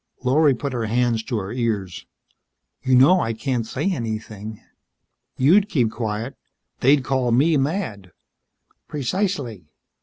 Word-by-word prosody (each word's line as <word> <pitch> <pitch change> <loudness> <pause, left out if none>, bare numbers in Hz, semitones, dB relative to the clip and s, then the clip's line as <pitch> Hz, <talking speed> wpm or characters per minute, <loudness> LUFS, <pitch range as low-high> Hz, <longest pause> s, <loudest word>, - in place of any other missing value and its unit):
Lorry 140 +2 +4
put 140 +2 -4
her 115 -3 -2
hands 120 0 +1
to 120 - -2
her 95 -1 -4
ears. 110 -7 -3 0.7
"You 130 -1 +2
know 145 +9 +6
I 115 -8 -1
can't 120 0 -2
say 195 - -1
anything. 110 - -5 0.8
You'd 190 +10 +4
keep 120 - +1
quiet. 115 +1 -4 0.4
They'd 135 +1 +4
call 130 -1 0
me 145 +7 +4
mad." 135 - -2 0.8
"Precisely." 140 - -2
125 Hz, 125 wpm, -22 LUFS, 110-140 Hz, 0.8 s, know